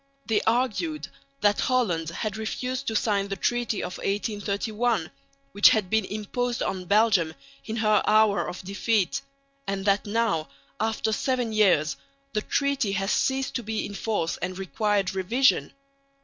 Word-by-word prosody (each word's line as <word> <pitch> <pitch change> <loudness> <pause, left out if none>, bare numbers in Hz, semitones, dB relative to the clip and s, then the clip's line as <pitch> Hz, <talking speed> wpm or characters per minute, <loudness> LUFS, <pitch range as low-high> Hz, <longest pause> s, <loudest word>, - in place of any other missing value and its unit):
They 220 -3 +1
argued 195 - 0 0.3
that 205 0 +3
Holland 185 -11 +1
had 205 +4 -3
refused 250 +5 -3
to 220 - -1
sign 205 -2 +1
the 195 - -3
treaty 240 +2 -1
of 180 - -5
1831, 210 0 -1 0.4
which 205 - +7
had 205 -4 +1
been 220 -2 +2
imposed 235 +5 -2
on 185 -1 -3
Belgium 200 -5 +3 0.3
in 220 - -4
her 215 -2 +3
hour 215 -1 +4
of 185 - -7
defeat; 200 +1 0 0.5
and 195 0 -2
that 200 +1 +2
now, 205 -8 0 0.3
after 220 0 0
seven 250 -1 0
years, 165 -9 +3 0.4
the 210 - 0
treaty 280 -5 0
had 195 +1 0
ceased 265 0 0
to 240 - -2
be 220 -1 -3
in 205 - -7
force 200 -5 -1
and 185 +1 -4
required 200 0 0
revision. 230 +9 +2
210 Hz, 150 wpm, -26 LUFS, 195-225 Hz, 0.5 s, which